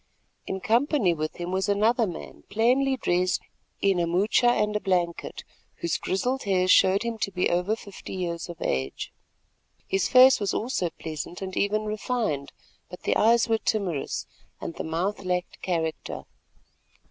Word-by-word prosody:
In 190 Hz, 0 st, -3 dB
company 235 Hz, -, +2 dB
with 155 Hz, -1 st, -3 dB
him 175 Hz, +1 st, -5 dB
was 190 Hz, +1 st, 0 dB
another 220 Hz, +3 st, +3 dB
man 175 Hz, -, -8 dB
plainly 255 Hz, +6 st, +2 dB
dressed 180 Hz, -4 st, +1 dB, 0.4 s
in 195 Hz, -2 st, +3 dB
a 170 Hz, -, +1 dB
moocha 195 Hz, +8 st, +3 dB
and 210 Hz, -3 st, +2 dB
a -, -, +2 dB
blanket, 175 Hz, -4 st, -1 dB, 0.3 s
whose 170 Hz, -, -2 dB
grizzled 250 Hz, +8 st, -1 dB
hair 185 Hz, -2 st, +2 dB
showed 190 Hz, +2 st, +5 dB
him 230 Hz, -1 st, -3 dB
to 200 Hz, -, 0 dB
be 180 Hz, -2 st, 0 dB
over 180 Hz, +5 st, +1 dB
fifty 200 Hz, -3 st, -9 dB
years 170 Hz, -2 st, -3 dB
of 170 Hz, -1 st, -8 dB
age. 65 Hz, +1 st, -2 dB, 0.7 s
His 195 Hz, -1 st, +1 dB
face 255 Hz, -1 st, +7 dB
also 200 Hz, -, 0 dB, 0.2 s
was 170 Hz, -, -2 dB
pleasant 160 Hz, +3 st, -6 dB
and 190 Hz, -1 st, -5 dB
even 215 Hz, +1 st, +1 dB
refined, 210 Hz, -, -2 dB, 0.4 s
but 180 Hz, -, -10 dB
the -, -, +1 dB
eyes 230 Hz, +2 st, +4 dB
were 225 Hz, -1 st, +2 dB
timorous, 190 Hz, -12 st, -1 dB, 0.3 s
and -, -, -5 dB
the -, -, -5 dB
mouth 180 Hz, +6 st, -2 dB
lacked 180 Hz, 0 st, -2 dB
character. 165 Hz, -3 st, -2 dB
190 Hz, 160 wpm, -26 LUFS, 175-220 Hz, 0.7 s, face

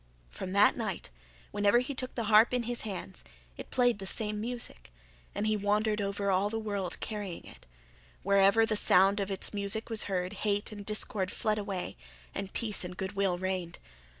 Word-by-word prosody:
From 185 Hz, -, -6 dB
that 200 Hz, +1 st, +6 dB
night, 210 Hz, -, -4 dB, 0.4 s
whenever 205 Hz, +2 st, +4 dB
he 250 Hz, +3 st, 0 dB
took 255 Hz, -1 st, -4 dB
the 235 Hz, -, -1 dB
harp 220 Hz, +3 st, +5 dB
in 245 Hz, -, 0 dB
his 240 Hz, +1 st, -1 dB
hands, 190 Hz, -, -5 dB, 0.3 s
it -, -, -9 dB
played 245 Hz, -4 st, +2 dB
the 195 Hz, -, -5 dB
same 210 Hz, +1 st, -1 dB
music; 235 Hz, -, -5 dB, 0.4 s
and 210 Hz, -, -1 dB
he 215 Hz, 0 st, +2 dB
wandered 210 Hz, +1 st, +1 dB
all 200 Hz, -, 0 dB
over 200 Hz, 0 st, +1 dB
the 225 Hz, -, -3 dB
world 205 Hz, -4 st, -3 dB
carrying 205 Hz, -5 st, -5 dB
it; -, -, -14 dB, 0.6 s
wherever 200 Hz, +3 st, +5 dB
the 220 Hz, -, 0 dB
sound 195 Hz, 0 st, +5 dB
of 200 Hz, -1 st, -1 dB
its 195 Hz, +1 st, -2 dB
music 205 Hz, +3 st, -1 dB
was 225 Hz, -, 0 dB
heard 185 Hz, -1 st, -2 dB
hate 205 Hz, 0 st, 0 dB
and 205 Hz, -1 st, -9 dB
discord 210 Hz, -3 st, -1 dB
fled 215 Hz, -2 st, 0 dB
away 195 Hz, -, -4 dB, 0.4 s
and 195 Hz, -, -4 dB
peace 215 Hz, -4 st, 0 dB
and 180 Hz, 0 st, -7 dB
good 190 Hz, 0 st, -3 dB
will 195 Hz, -3 st, 0 dB
reigned. 185 Hz, -2 st, -3 dB
205 Hz, 185 wpm, -30 LUFS, 195-220 Hz, 0.6 s, that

